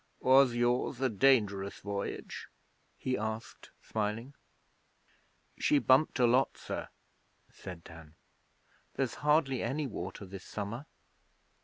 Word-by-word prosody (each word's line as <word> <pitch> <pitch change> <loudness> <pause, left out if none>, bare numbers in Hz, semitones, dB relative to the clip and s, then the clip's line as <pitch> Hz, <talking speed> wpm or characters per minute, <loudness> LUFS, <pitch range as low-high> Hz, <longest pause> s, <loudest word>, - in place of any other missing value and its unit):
'Was 130 -1 +5
yours 120 +1 +1
a 130 -1 +2
dangerous 105 -4 +2
voyage?' 100 -1 -5 0.5
he 130 - -1
asked, 110 +1 -5
smiling. 110 +5 -3 1.3
'She 150 - +4
bumped 135 +2 +4
a 125 - +4
lot, 125 +3 +3
sir,' - - -5 0.6
said 90 -2 -9
Dan. 80 -2 -13 0.8
'There's 135 -2 -1
hardly 150 -3 +3
any 140 +6 -1
water 105 -4 -6
this 95 0 -9
summer.' 110 +7 -5
120 Hz, 110 wpm, -32 LUFS, 100-135 Hz, 1.3 s, Was